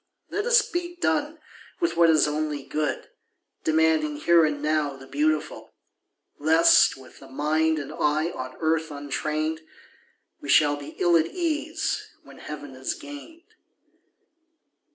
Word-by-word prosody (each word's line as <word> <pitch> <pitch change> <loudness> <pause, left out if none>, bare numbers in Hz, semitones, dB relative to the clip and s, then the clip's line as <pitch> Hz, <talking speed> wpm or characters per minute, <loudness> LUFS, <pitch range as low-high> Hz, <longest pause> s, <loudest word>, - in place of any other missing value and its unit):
Let 415 +3 -2
us 475 -2 +4
be 350 0 -4
done 310 -2 -1 0.4
with 345 -2 0
what 170 -1 +5
is 155 -2 +4
only 150 -1 -2
good, 150 +1 -3 0.5
Demanding 155 -1 +2
here 170 +2 +4
and 150 -1 -2
now 150 -1 0
the 135 - -13
beautiful; 150 +3 -2 0.6
Lest, 160 -1 +5
with 130 -1 -15
the - - -13
mind 155 +3 0
and 145 -3 -6
eye 155 +3 0
on 130 -4 -7
earth 160 0 0
untrained, 155 +2 -3 0.8
We - - -8
shall 145 -2 +5
be 145 +2 -10
ill 175 -1 +3
at 160 0 +1
ease 315 - -2 0.2
when - - -15
heaven - - -8
is - - -3
gained. 320 +1 -11
155 Hz, 135 wpm, -25 LUFS, 150-175 Hz, 0.8 s, what